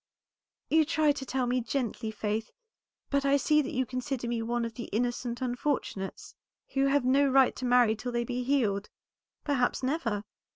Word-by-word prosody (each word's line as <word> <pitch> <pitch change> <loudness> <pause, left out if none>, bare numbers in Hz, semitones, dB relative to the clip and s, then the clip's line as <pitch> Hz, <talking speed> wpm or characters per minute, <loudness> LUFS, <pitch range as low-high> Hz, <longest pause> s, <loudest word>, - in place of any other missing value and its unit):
"You 320 0 +6
try 310 0 +2
to 270 -2 -4
tell 260 0 0
me 250 +1 +1
gently, 235 -2 -2
Faith, 215 +1 -2 0.6
but 280 0 +2
I 280 0 +4
see 300 +2 +3
that - - -4
you 260 0 0
consider 255 0 -3
me 235 -1 -1
one 235 +1 -1
of 230 - -5
the 235 +1 -6
innocent 240 +2 -2
unfortunates, 245 -6 -3 0.4
who 270 0 +1
have 275 -1 +2
no 275 +2 +4
right 270 -1 +4
to 255 - -4
marry 245 -3 +4
till 245 +3 -5
they 240 0 0
be 245 +1 -3
healed, 235 -7 0 0.5
perhaps 265 -3 0
never. 250 -7 -1
250 Hz, 175 wpm, -29 LUFS, 235-275 Hz, 0.6 s, You